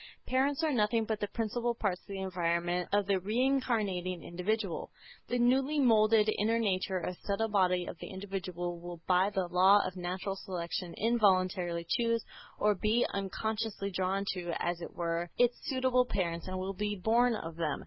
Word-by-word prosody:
Parents 275 +4 +1
are 310 -2 +2
nothing 225 -1 +2
but 215 -1 -2
the 205 - -1
principal 235 +3 -2
parts 195 -5 -1
of - - -30
the 195 -1 -5
environment 175 -1 -1
of 205 0 +2
the 195 -1 +1
re 210 +6 -2
incarnating 215 - 0
individual. 190 +1 -2 0.4
The 245 - 0
newly 265 +5 +3
moulded 220 -4 +5
inner 225 +3 +2
nature 190 -4 0
or 180 - -2
subtle 215 +2 0
body 185 -3 +2
of - - -8
the - - -7
individual 185 -3 -4
will 175 0 -8
by 185 +2 +3
the 190 -3 -1
law 190 +3 +5
of 185 - -4
"natural 185 +2 -3
selection" 180 -2 -4
involuntarily 185 -6 +2
choose, 230 -1 +1 0.3
or 210 0 +3
be 215 +5 +2
unconsciously 205 +1 -3
drawn 190 +2 -1
to, 175 -2 -4
as 175 0 -2
it - - -6
were, 170 0 -2
its 245 0 +4
suitable 255 -1 +2
parents 170 -5 -2
and 185 0 -3
will 190 +1 -3
be 205 +2 -2
born 230 +5 +3
of 165 -6 -6
them. 160 -4 -1
195 Hz, 175 wpm, -31 LUFS, 180-225 Hz, 0.4 s, moulded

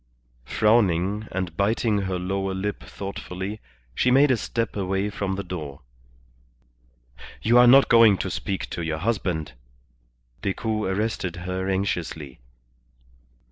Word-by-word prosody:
Frowning, 105 - +2
and 90 -2 -3
biting 105 +2 +1
her 95 -2 -2
lower 95 +1 -2
lip 100 +2 -3
thoughtfully, 100 +1 -6 0.3
she 125 - +2
made 135 +2 +5
a - - +4
step 115 +1 -3
away 95 +1 -1
from 100 -1 -2
the 100 - -4
door. 75 -6 -7 1.6
"You 120 +2 +5
are 125 - +7
not 135 +3 +7
going 115 -4 +6
to - - -3
speak 95 -1 -3
to 85 - -4
your 80 -1 -2
husband?" 90 - -2 0.9
Decoud 105 +1 -2
arrested 95 -3 -2
her 95 +1 -2
anxiously. 85 -8 -3
95 Hz, 125 wpm, -24 LUFS, 90-110 Hz, 1.6 s, are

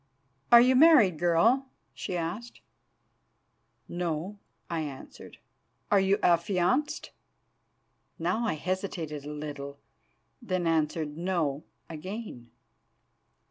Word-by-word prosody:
"'Are 235 0 +10
you 255 +1 +4
married, 255 - +6
girl?' 215 +11 +3 0.3
she 180 - -4
asked. 175 +9 -5 1.3
"'No,' 175 +3 -4 0.3
I 170 - -3
answered. 140 -3 -9 0.5
"'Are 200 - +5
you 195 +1 +2
affianced?' 180 - +1 1.1
"Now 180 +8 -1
I 185 - 0
hesitated 165 -4 -4
a 150 - -6
little, 145 -1 -7 0.6
then 185 -6 -2
answered 155 -2 0
'No' 165 -5 -1 0.2
again. 165 - -8
175 Hz, 95 wpm, -28 LUFS, 155-205 Hz, 1.3 s, Are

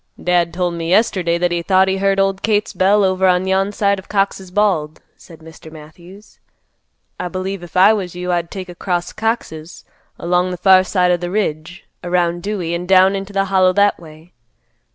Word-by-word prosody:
"Dad 175 -1 +1
told 175 0 -2
me 165 -1 -5
yesterday 180 -4 +1
that 175 0 0
he 170 0 -1
thought 190 +2 +2
he 190 0 0
heard 195 0 +1
old 195 0 0
Kate's 210 -1 0
bell 200 +2 +2
over 190 0 +1
on 180 0 +2
yon 190 +1 0
side 200 -1 0
of 190 - -15
Cox's 195 -2 -1
Bald," 180 -6 0 0.2
said 165 -2 -16
Mr. 160 0 -14
Matthews; 170 +6 -15 0.8
"I 180 - -3
believe 185 +1 -5
if 175 +1 -8
I 195 +4 +6
was 185 -5 -4
you 180 0 -4
I'd 170 -1 -1
take 190 -1 -7
across 175 0 -4
Cox's, 180 -8 -4 0.3
along 180 +1 0
the 180 - -5
far 185 +1 +5
side 180 -1 +1
of 175 - +1
th' 175 - -5
ridge, 170 -4 -4 0.2
around 175 -1 -1
Dewey 185 -4 -3
an' 175 +1 -4
down 190 +1 +4
into 195 +1 -6
the 195 -1 0
Hollow 185 -1 +2
that 205 +1 +2
way. 160 +1 -16
185 Hz, 195 wpm, -17 LUFS, 175-195 Hz, 0.8 s, I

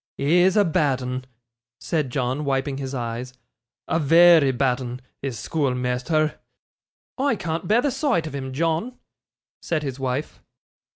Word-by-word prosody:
'He's 175 +7 +3
a 205 - +5
bad 145 -5 +1
'un,' 125 0 -4 0.5
said 155 -6 -1
John, 130 +3 -1
wiping 135 0 -1
his 135 0 -4
eyes; 120 +1 -4 0.5
'a 165 - +1
very 165 -1 +6
bad 130 0 0
'un, 125 0 -6 0.2
is 135 -4 -4
schoolmeasther.' 135 +1 -1 0.8
'I 275 -2 +2
can't 170 -2 -4
bear 225 +5 +3
the 285 - +1
sight 265 - 0
of 155 - -6
him, 130 -2 -5
John,' 165 - -1 0.6
said 155 -3 -2
his 135 -2 -5
wife. 130 +3 -3
140 Hz, 140 wpm, -23 LUFS, 130-165 Hz, 0.8 s, very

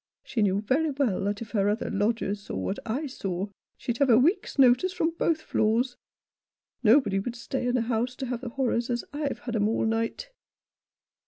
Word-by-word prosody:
She 235 - -2
knew 200 -1 +2
very 280 +9 +1
well 265 -9 0
that 205 +2 -2
if 225 - -13
her 205 -2 +2
other 210 +3 -1
lodgers 205 0 0
saw - - -7
what 195 - -2
I 260 +8 -1
saw, 195 -7 -4 0.3
she'd 240 -1 -3
have 280 -2 +3
a 225 - +7
week's 335 - +2
notice 260 +7 +5
from 335 -3 0
both 325 -2 +2
floors. 240 +2 +1 0.9
Nobody 220 -4 +4
would 235 +4 -4
stay 245 +1 -3
in 245 - +1
the 250 - +2
house 240 +2 -1
to 265 - -4
have 245 -1 -3
the 250 - -5
horrors 240 -1 -1
as 240 -1 -1
I've 290 -1 -3
had 240 -1 -4
'em 210 -1 +2
all 225 - 0
night." 225 - -2
240 Hz, 195 wpm, -27 LUFS, 215-265 Hz, 0.9 s, a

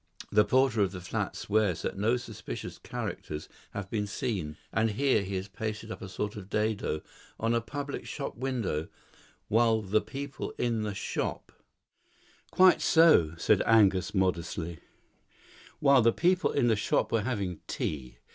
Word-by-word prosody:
The 105 - +6
porter 130 -2 +3
of 100 -1 +1
the 95 - -5
flats 90 - -3
swears 105 -4 +1
that - - -2
no 110 +5 +2
suspicious 110 - -7
characters 75 0 -5 0.2
have 100 -2 -5
been 105 -2 -1
seen, 100 - -3 0.2
and 110 +1 +2
here 130 +1 +2
he 100 0 -4
has 95 +1 -3
pasted 110 +2 -5
up - - -7
a 95 - -7
sort 105 +2 -3
of 100 -2 -9
dado 105 -8 -1 0.4
on 115 +1 +1
a 115 - +2
public 140 +3 -5
shop 140 - -5
window, 115 - -2 0.6
while 115 0 +3
the 105 +2 +2
people 140 0 -6
in 115 -2 0
the 105 -2 -3
shop - - -3 0.5
" - - -32 0.2
"Quite 185 0 +6
so," 155 - +5
said - - +3
Angus 100 -4 +4
modestly, 85 -3 -1 1.0
"while 140 -3 +6
the 115 +1 +5
people 180 +7 +2
in 140 - +2
the 115 -2 +4
shop 105 - 0
were 115 - +2
having 100 -7 -2
tea. 65 -5 -4
110 Hz, 160 wpm, -29 LUFS, 95-120 Hz, 1.0 s, The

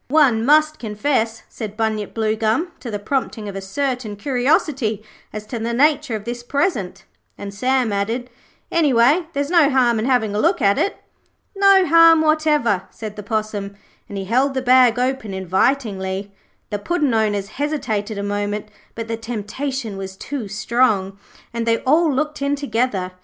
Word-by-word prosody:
'One 265 -6 +3
must 305 +3 +3
confess,' 225 +1 -1
said 215 -2 -7
Bunyip 220 -2 -2
Bluegum, 220 +9 0
'to 245 - -7
the 210 - -3
prompting 220 -1 -3
of 200 - -6
a 195 - -4
certain 250 +1 -3
curiosity 250 -2 0 0.3
as 215 0 -7
to 235 +2 -5
the 235 +1 -2
nature 295 -2 +2
of 210 - -5
this 240 +2 -5
present'; 240 - -2 0.3
and 200 0 -7
Sam 250 +1 0
added, 230 +5 -2 0.4
'Anyway, 295 +1 +3
there's 285 +2 -2
no 330 -5 +5
harm 245 -4 +2
in 220 - -1
having 245 -5 +1
a 205 - -1
look 345 - +2
at 200 -4 +3
it.' 400 - 0 0.6
'No 390 -1 +5
harm 330 0 +6
whatever,' 305 - +2
said 215 -2 -8
the 210 - -6
Possum, 205 -1 -3 0.3
and 200 - -6
he 195 - -4
held 260 +6 +1
the 260 - -1
bag 250 -2 +5
open 250 -5 -2
invitingly. 190 0 -1 0.4
The 205 - -2
Puddin' 300 - 0
owners 205 -3 0
hesitated 220 -7 -3
a 200 - -3
moment, 205 +1 -3 0.3
but 230 -1 -5
the 225 0 -3
temptation 225 +1 -4
was 190 0 -7
too 270 -3 -5
strong, 205 -2 0 0.3
and 235 0 -3
they 230 0 +3
all 310 +4 +3
looked 300 +2 -2
in 280 +1 +1
together. 230 -8 -1
235 Hz, 165 wpm, -20 LUFS, 210-280 Hz, 0.6 s, harm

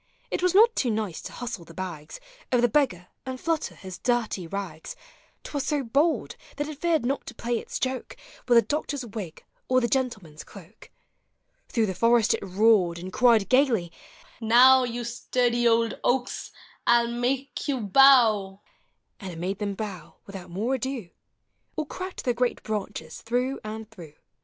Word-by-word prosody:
It - - -1
was 365 0 +2
not 455 +3 +6
too 250 - +1
nice 215 -6 -2
to - - -8
hustle 240 -7 -6
the 165 0 -15
bags 170 -5 -7 0.3
Of 245 -1 +3
the - - +6
beggar, 210 - 0
and 260 -1 -5
tlutter 325 +3 -2
his 185 -2 -9
dirty 235 -8 -1
rags: 175 -4 -6 0.5
T - - -9
was 285 -2 -1
so 295 -3 0
bold, 285 +8 +1 0.2
that 290 0 -2
it 305 -2 -8
feared 330 -6 +1
not 275 +3 -2
to 240 - -8
play 235 0 -2
its - - -6
joke 260 0 -3 0.3
With 245 - +4
the 230 - +6
doctor's 290 -3 -3
wig 200 -7 -7 0.3
or 255 0 +4
the 240 - 0
gentleman's 215 - -2
cloak. 200 +2 -15 0.8
Through 225 -2 +1
the 190 - -2
forest 230 +2 +3
it - - -3
roared, 195 -2 +3
and 185 +2 -8
cried, 230 -5 +4
gayly, 250 - +2 0.5
u 225 - -6
Now, 255 +3 +7
You 240 0 -4
sturdy 240 0 0
old 230 -1 +2
oaks, 250 0 -1 0.4
I 240 0 +6
'11 235 +1 -3
make 270 +3 -2
you 270 -4 -1
bow! 215 -4 +5 0.3
" - - -49
And 195 -3 -7
it 165 - -9
made 190 +4 -3
them 200 -2 -2
bow 190 -6 -7
without 195 -4 -9
more 210 +9 -2
ado. 260 -7 -4 0.6
Or 310 - -2
cracked 370 +5 -7
their 245 - +2
great 245 +1 -1
branches 205 -6 -5
through 250 +4 -1
and 215 +1 -6
through. 170 -8 -12
235 Hz, 180 wpm, -26 LUFS, 195-260 Hz, 0.8 s, Now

